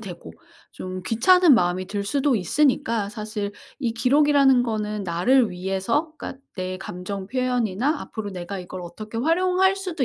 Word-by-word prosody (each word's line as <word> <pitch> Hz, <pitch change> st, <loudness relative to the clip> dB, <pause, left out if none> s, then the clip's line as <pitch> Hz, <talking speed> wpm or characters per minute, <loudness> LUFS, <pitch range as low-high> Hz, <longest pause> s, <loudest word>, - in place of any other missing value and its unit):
되고 175 Hz, -, -9 dB, 0.4 s
좀 185 Hz, 0 st, -6 dB
귀찮은 305 Hz, -, +5 dB
마음이 180 Hz, -3 st, +1 dB
들 200 Hz, +1 st, -3 dB
수도 275 Hz, +4 st, +1 dB
있으니까 225 Hz, -, +1 dB
사실 210 Hz, -1 st, -5 dB, 0.3 s
이 245 Hz, -5 st, -1 dB
기록이라는 275 Hz, +1 st, +4 dB
거는 215 Hz, -3 st, -2 dB
나를 205 Hz, +8 st, +3 dB
위해서 195 Hz, -, -1 dB
그러니까 265 Hz, -, -8 dB
내 185 Hz, 0 st, -4 dB
감정 190 Hz, +1 st, -6 dB
표현이나 250 Hz, -, 0 dB
앞으로 215 Hz, -2 st, -6 dB
내가 185 Hz, +1 st, -6 dB
이걸 180 Hz, 0 st, -7 dB
어떻게 210 Hz, +6 st, -8 dB
활용할 365 Hz, +7 st, +2 dB
수도 360 Hz, -7 st, -2 dB
220 Hz, 340 characters per minute, -23 LUFS, 190-275 Hz, 0.4 s, 귀찮은